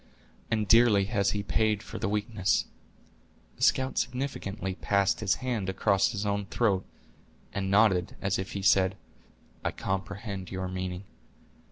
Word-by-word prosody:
"And 110 Hz, -2 st, 0 dB
dearly 115 Hz, -3 st, +5 dB
has 100 Hz, -2 st, +1 dB
he 100 Hz, +1 st, -2 dB
paid 110 Hz, 0 st, +1 dB
for -, -, -7 dB
the 95 Hz, -, -1 dB
weakness." 105 Hz, -2 st, 0 dB, 0.9 s
The -, -, -16 dB
scout 130 Hz, 0 st, +2 dB
significantly 110 Hz, -7 st, -3 dB
passed 100 Hz, 0 st, +1 dB
his 105 Hz, -3 st, +1 dB
hand 110 Hz, -7 st, -1 dB
across 95 Hz, 0 st, +2 dB
his 105 Hz, -2 st, -3 dB
own 100 Hz, -1 st, -1 dB
throat, 100 Hz, -5 st, +1 dB, 0.7 s
and 95 Hz, -1 st, -2 dB
nodded, 100 Hz, -3 st, +3 dB
as 100 Hz, 0 st, 0 dB
if 95 Hz, -, -5 dB
he 100 Hz, -, -4 dB
said, 95 Hz, -1 st, +4 dB, 0.7 s
"I -, -, +1 dB
comprehend 100 Hz, 0 st, -4 dB
your 95 Hz, -1 st, -3 dB
meaning." 90 Hz, 0 st, -4 dB
100 Hz, 145 wpm, -28 LUFS, 95-110 Hz, 0.9 s, dearly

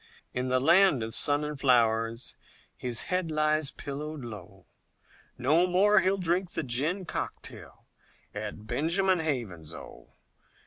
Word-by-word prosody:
In 125 Hz, +1 st, -2 dB
the 130 Hz, 0 st, +2 dB
land 165 Hz, -2 st, +5 dB
of 110 Hz, 0 st, -5 dB
sun 145 Hz, +7 st, +1 dB
and 150 Hz, -1 st, -4 dB
flowers, 115 Hz, -2 st, +2 dB, 0.4 s
His 120 Hz, -2 st, -2 dB
head 180 Hz, -2 st, -1 dB
lies 155 Hz, -1 st, +1 dB
pillowed 150 Hz, +1 st, -6 dB
low, 100 Hz, -4 st, -10 dB, 0.7 s
No 155 Hz, +8 st, +3 dB
more 200 Hz, +4 st, +5 dB
he'll 190 Hz, +1 st, +2 dB
drink 180 Hz, 0 st, -1 dB
the -, -, -2 dB
gin 150 Hz, +10 st, -1 dB
cocktail, -, -, -6 dB, 0.5 s
At 105 Hz, 0 st, -6 dB
Benjamin 180 Hz, -, +1 dB
Haven's, 105 Hz, -, -3 dB
Oh! -, -, -12 dB
145 Hz, 130 wpm, -29 LUFS, 115-170 Hz, 0.7 s, land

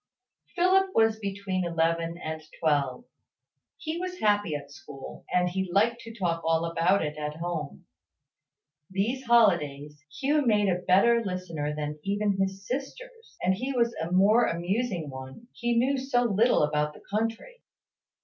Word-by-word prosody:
Philip 380 Hz, +2 st, +3 dB
was 225 Hz, -1 st, +3 dB
between 195 Hz, -2 st, -3 dB
eleven 165 Hz, 0 st, 0 dB
and 160 Hz, -2 st, -5 dB, 0.2 s
twelve. 145 Hz, -, 0 dB, 0.7 s
He 320 Hz, 0 st, -4 dB
was 365 Hz, 0 st, -4 dB
happy 205 Hz, -, +1 dB
at 145 Hz, -1 st, -7 dB
school: 135 Hz, -1 st, -11 dB
and 180 Hz, 0 st, +2 dB
he 190 Hz, 0 st, -2 dB
liked 230 Hz, +5 st, +2 dB
to 230 Hz, -, -9 dB
talk 170 Hz, -4 st, -1 dB
all 165 Hz, 0 st, +1 dB
about 170 Hz, +2 st, +2 dB
it 150 Hz, 0 st, -5 dB
at 150 Hz, 0 st, -4 dB
home. 165 Hz, -3 st, -5 dB, 1.0 s
These 225 Hz, +8 st, -1 dB
holidays, 150 Hz, -11 st, +2 dB, 0.2 s
Hugh 290 Hz, +2 st, +2 dB
made 210 Hz, -5 st, +3 dB
a 180 Hz, 0 st, 0 dB
better 230 Hz, +6 st, +4 dB
listener 170 Hz, -6 st, -3 dB
than 150 Hz, 0 st, -4 dB
even 200 Hz, +1 st, 0 dB
his 195 Hz, +1 st, -2 dB
sisters; 455 Hz, -, -7 dB
and 185 Hz, -, +3 dB
he 255 Hz, +8 st, -3 dB
was 235 Hz, -2 st, +1 dB
a 165 Hz, +2 st, -3 dB
more 205 Hz, +6 st, +5 dB
amusing 175 Hz, -, -2 dB
one 130 Hz, -, -10 dB
he 240 Hz, -1 st, -1 dB
knew 265 Hz, +3 st, +2 dB
so 255 Hz, -2 st, +1 dB
little 230 Hz, -3 st, +3 dB
about 150 Hz, 0 st, 0 dB
the -, -, -14 dB
country. 225 Hz, -, -3 dB
195 Hz, 150 wpm, -27 LUFS, 165-235 Hz, 1.0 s, more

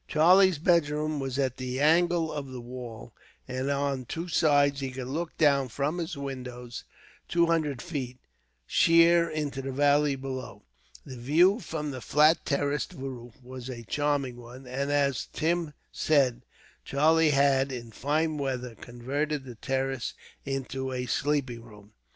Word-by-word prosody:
Charlie's 180 Hz, +3 st, +5 dB
bedroom 155 Hz, -2 st, +1 dB
was 135 Hz, -1 st, -3 dB
at 130 Hz, -3 st, 0 dB
the 130 Hz, 0 st, -4 dB
angle 165 Hz, +2 st, +3 dB
of 140 Hz, -3 st, -5 dB
a 130 Hz, -, -6 dB
wall, 120 Hz, -2 st, -9 dB, 0.3 s
and 130 Hz, +1 st, -3 dB
on 140 Hz, -2 st, -1 dB
two 165 Hz, +8 st, -5 dB
sides 145 Hz, -4 st, +3 dB
he 135 Hz, -1 st, -3 dB
could 130 Hz, 0 st, -6 dB
look 160 Hz, +6 st, -4 dB
down 140 Hz, -4 st, +3 dB
from 145 Hz, +8 st, -2 dB
his 165 Hz, -3 st, -4 dB
windows, 125 Hz, -3 st, -7 dB, 0.4 s
two 170 Hz, 0 st, +3 dB
hundred 155 Hz, -6 st, 0 dB
feet, 135 Hz, -7 st, -5 dB, 0.5 s
sheer 170 Hz, -, +5 dB
into 145 Hz, -3 st, -3 dB
the 135 Hz, 0 st, -4 dB
valley 145 Hz, +1 st, +3 dB
below. 130 Hz, -1 st, -7 dB, 0.4 s
The 130 Hz, -, -8 dB
view 170 Hz, -, +4 dB
from 150 Hz, -8 st, -4 dB
the 130 Hz, -2 st, -7 dB
flat 150 Hz, +6 st, +4 dB
terraced 145 Hz, +1 st, -1 dB
roof 125 Hz, -3 st, -8 dB
was 130 Hz, 0 st, -8 dB
a 120 Hz, -2 st, -7 dB
charming 140 Hz, -1 st, -1 dB
one, 120 Hz, +2 st, -12 dB
and, 135 Hz, +3 st, -3 dB
as 140 Hz, -3 st, +1 dB
Tim 165 Hz, 0 st, 0 dB, 0.2 s
said, 135 Hz, -6 st, +2 dB, 0.4 s
Charlie 160 Hz, +3 st, +3 dB
had, 140 Hz, -1 st, +3 dB
in 120 Hz, -2 st, -6 dB
the 110 Hz, -, -18 dB
fine 155 Hz, +3 st, 0 dB
weather, 125 Hz, -3 st, -3 dB
converted 135 Hz, +6 st, -3 dB
the 125 Hz, -, -8 dB
terrace 135 Hz, +1 st, -2 dB, 0.3 s
into 135 Hz, -1 st, -3 dB
a 125 Hz, -1 st, -3 dB
sleeping 130 Hz, -3 st, -1 dB
room. 105 Hz, -3 st, -15 dB
140 Hz, 150 wpm, -28 LUFS, 130-150 Hz, 0.5 s, Charlie's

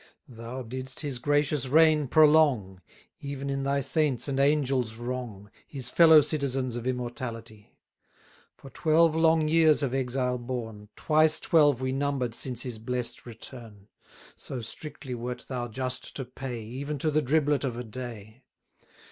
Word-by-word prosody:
Thou 115 Hz, +3 st, -7 dB
didst 130 Hz, +4 st, -6 dB
his 140 Hz, -5 st, -4 dB
gracious 145 Hz, 0 st, +1 dB
reign 155 Hz, 0 st, +4 dB
prolong, 145 Hz, -, +4 dB, 0.4 s
Even 140 Hz, 0 st, -5 dB
in 135 Hz, 0 st, -2 dB
thy 140 Hz, +1 st, 0 dB
saints' 140 Hz, -3 st, 0 dB
and 135 Hz, -1 st, -1 dB
angels' 135 Hz, -5 st, +1 dB
wrong, 120 Hz, -4 st, -6 dB, 0.2 s
His 130 Hz, -4 st, -5 dB
fellow 160 Hz, -1 st, +7 dB
citizens 135 Hz, -4 st, -1 dB
of 120 Hz, +1 st, -4 dB
immortality: 120 Hz, -4 st, -6 dB, 0.8 s
For 135 Hz, -, -13 dB
twelve 160 Hz, 0 st, +3 dB
long 160 Hz, -1 st, +3 dB
years 155 Hz, -2 st, +4 dB
of 130 Hz, -2 st, -1 dB
exile 125 Hz, -1 st, -1 dB
borne, 115 Hz, -4 st, -6 dB
Twice 155 Hz, 0 st, +3 dB
twelve 145 Hz, -6 st, +3 dB
we 130 Hz, -, 0 dB
number'd 135 Hz, -3 st, -1 dB
since 125 Hz, 0 st, -3 dB
his 120 Hz, -4 st, -6 dB
blest 125 Hz, +1 st, -4 dB
return: 115 Hz, -3 st, -11 dB, 0.5 s
So 130 Hz, -, -7 dB
strictly 140 Hz, +3 st, -8 dB
wert 125 Hz, +1 st, -5 dB
thou 125 Hz, -2 st, -3 dB
just 130 Hz, +2 st, -4 dB
to 135 Hz, -, -4 dB
pay, 125 Hz, -2 st, -6 dB
Even 140 Hz, +7 st, -5 dB
to 155 Hz, +3 st, 0 dB
the 155 Hz, +1 st, +2 dB
driblet 145 Hz, 0 st, +1 dB
of 125 Hz, -4 st, -2 dB
a 125 Hz, -, -4 dB
day. 115 Hz, -1 st, -9 dB
130 Hz, 150 wpm, -27 LUFS, 120-145 Hz, 0.8 s, fellow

